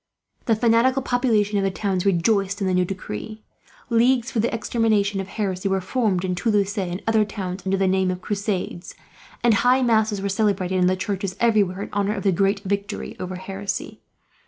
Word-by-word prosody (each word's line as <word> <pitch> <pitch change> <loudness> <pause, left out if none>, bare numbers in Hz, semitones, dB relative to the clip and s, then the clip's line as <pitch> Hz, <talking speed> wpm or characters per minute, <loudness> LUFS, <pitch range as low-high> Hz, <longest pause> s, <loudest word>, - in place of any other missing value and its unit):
The 225 - +3
fanatical 235 +4 +3
populations 220 -6 +1
of - - 0
the 195 - +2
towns 190 -1 -1
rejoiced 195 +2 +1
in 195 - -1
the 185 - +1
new 180 0 +2
decree. 195 - -6 0.5
Leagues 240 +2 +3
for 230 - -1
the 230 - +1
extermination 215 -3 +1
of 190 - -7
heresy 195 -2 -2
were 190 0 +1
formed, 190 -3 0
in 180 - -1
Toulouse 205 +1 0
and 180 -1 -3
other 225 -1 +3
towns, 195 -3 -5
under 195 +1 +1
the 190 0 +2
name 190 0 +2
of 180 0 -2
Crusades; 195 -3 -3 0.5
and 240 -2 +5
high 250 +5 +3
masses 220 -3 +2
were 200 - -2
celebrated 195 -2 0
in 180 - +4
the 185 - +2
churches, 190 0 -3
everywhere, 205 -5 +2
in - - -9
honour 205 +1 0
of - - -5
the 195 - +3
great 195 +2 +1
victory 200 0 -3
over 185 0 -5
heresy. 195 +2 -5
200 Hz, 190 wpm, -23 LUFS, 185-220 Hz, 0.5 s, and